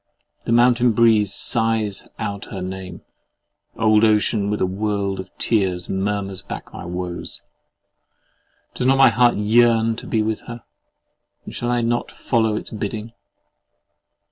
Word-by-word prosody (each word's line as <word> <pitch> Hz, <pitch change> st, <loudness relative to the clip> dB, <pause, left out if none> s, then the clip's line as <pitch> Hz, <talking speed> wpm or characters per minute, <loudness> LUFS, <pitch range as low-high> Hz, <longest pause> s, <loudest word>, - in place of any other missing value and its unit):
The -, -, -2 dB
mountain 120 Hz, 0 st, +4 dB
breeze 110 Hz, -3 st, +4 dB
sighs 110 Hz, -1 st, +1 dB
out 100 Hz, -2 st, -4 dB
her 95 Hz, -2 st, -7 dB
name: 95 Hz, -1 st, -7 dB, 0.7 s
old 110 Hz, -1 st, +3 dB
ocean 105 Hz, -1 st, +2 dB
with 105 Hz, -, -1 dB
a -, -, +2 dB
world 100 Hz, 0 st, -2 dB
of 95 Hz, 0 st, -7 dB
tears 95 Hz, -5 st, 0 dB
murmurs 95 Hz, -1 st, -2 dB
back 100 Hz, -, -9 dB
my -, -, -8 dB
woes! 90 Hz, 0 st, -6 dB, 1.3 s
Does 125 Hz, -, -1 dB
not 135 Hz, +1 st, +4 dB
my 135 Hz, -, +7 dB
heart 120 Hz, -1 st, +3 dB
yearn 115 Hz, +1 st, +3 dB
to -, -, -9 dB
be 110 Hz, -2 st, 0 dB
with 110 Hz, 0 st, -2 dB
her; 120 Hz, -1 st, -8 dB, 0.8 s
and -, -, -9 dB
shall 120 Hz, -, -3 dB
I 120 Hz, 0 st, +1 dB
not 120 Hz, +1 st, -1 dB
follow 110 Hz, -3 st, 0 dB
its -, -, -5 dB
bidding? 110 Hz, +1 st, -5 dB
110 Hz, 145 wpm, -21 LUFS, 100-115 Hz, 1.3 s, my